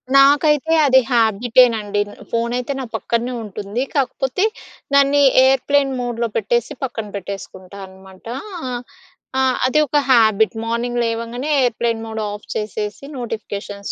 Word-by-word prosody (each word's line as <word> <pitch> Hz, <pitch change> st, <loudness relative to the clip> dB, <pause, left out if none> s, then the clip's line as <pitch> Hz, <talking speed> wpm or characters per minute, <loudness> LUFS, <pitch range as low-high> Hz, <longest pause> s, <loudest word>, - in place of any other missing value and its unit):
నాకైతే 290 Hz, +3 st, +5 dB
అది 260 Hz, -1 st, +6 dB
హ్యాబిటేనండి. 225 Hz, -2 st, +3 dB
న్ -, -, -12 dB, 0.2 s
ఫోనయితే 240 Hz, +3 st, -1 dB
నా 265 Hz, -, -4 dB
పక్కన్నే 235 Hz, +2 st, -2 dB
ఉంటుంది. 210 Hz, +3 st, -4 dB
కాకపోతే, 265 Hz, +4 st, 0 dB, 0.5 s
దాన్ని 280 Hz, +1 st, +4 dB, 0.2 s
ఎయిర్‌ప్లేన్ 270 Hz, +1 st, +2 dB
మోడ్‌లో 240 Hz, -1 st, -2 dB
పెట్టేసి 230 Hz, +2 st, 0 dB
పక్కన 225 Hz, -4 st, -4 dB
పెట్టేసుకుంటా 195 Hz, 0 st, -8 dB
అనమాటా. 190 Hz, +4 st, -11 dB, 1.0 s
ఆ! -, -, +3 dB, 0.3 s
అది 305 Hz, +4 st, +2 dB
ఒక 295 Hz, -, +1 dB
habit. 220 Hz, -2 st, +4 dB
Morning 240 Hz, +1 st, -1 dB
లేవంగనే 230 Hz, +4 st, -3 dB
airplane 230 Hz, -1 st, -1 dB
mode 220 Hz, -1 st, -4 dB
of 205 Hz, 0 st, -9 dB
చేసేసి, 210 Hz, +1 st, -4 dB
నోటిఫికేషన్స్ 205 Hz, -4 st, -6 dB
235 Hz, 115 wpm, -19 LUFS, 210-260 Hz, 1.0 s, అది